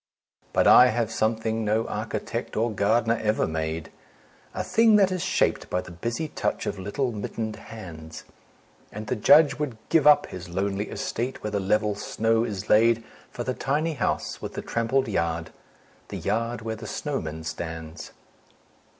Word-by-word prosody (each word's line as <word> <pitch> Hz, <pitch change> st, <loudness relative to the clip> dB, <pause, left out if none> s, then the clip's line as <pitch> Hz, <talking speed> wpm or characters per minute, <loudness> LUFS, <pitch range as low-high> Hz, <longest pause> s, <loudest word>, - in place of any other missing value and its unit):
But -, -, +2 dB
I 125 Hz, -, +9 dB
have 115 Hz, -2 st, 0 dB
something 110 Hz, 0 st, 0 dB
no 110 Hz, +2 st, +1 dB
architect -, -, -4 dB
or 115 Hz, +1 st, +1 dB
gardener 115 Hz, +3 st, +2 dB
ever 105 Hz, 0 st, +1 dB
made, 80 Hz, 0 st, -3 dB, 0.6 s
A -, -, -1 dB
thing 225 Hz, -1 st, +4 dB
that 195 Hz, -2 st, +5 dB
is 185 Hz, -1 st, -2 dB
shaped -, -, +1 dB
by 90 Hz, -, 0 dB
the 90 Hz, -, -11 dB
busy 115 Hz, -, -3 dB
touch -, -, -2 dB
of -, -, -3 dB
little 110 Hz, +7 st, -2 dB
mittened 110 Hz, 0 st, -4 dB
hands: 85 Hz, -9 st, -10 dB, 0.7 s
And 105 Hz, +1 st, -6 dB
the 115 Hz, -, -1 dB
Judge 145 Hz, +5 st, +5 dB
would 140 Hz, -7 st, -3 dB
give 160 Hz, -3 st, +4 dB
up 150 Hz, -, +7 dB
his 90 Hz, -1 st, -9 dB
lonely 100 Hz, +3 st, -2 dB
estate, 125 Hz, +3 st, -4 dB
where 105 Hz, -, -3 dB
the 100 Hz, -, 0 dB
level 105 Hz, +2 st, +1 dB
snow 115 Hz, +2 st, 0 dB
is 105 Hz, -3 st, -4 dB
laid 115 Hz, +1 st, +4 dB, 0.3 s
For 120 Hz, -, -5 dB
the 130 Hz, -, -2 dB
tiny 150 Hz, +6 st, -1 dB
house 130 Hz, -, -2 dB
with -, -, -6 dB
the -, -, -4 dB
trampled 120 Hz, +3 st, 0 dB
yard, 85 Hz, -5 st, -1 dB, 0.6 s
the -, -, -6 dB
yard 115 Hz, +1 st, -1 dB
where 110 Hz, 0 st, -3 dB
the 110 Hz, -, -9 dB
snowman 80 Hz, 0 st, -4 dB
stands. 80 Hz, 0 st, -6 dB
110 Hz, 165 wpm, -26 LUFS, 95-120 Hz, 0.7 s, I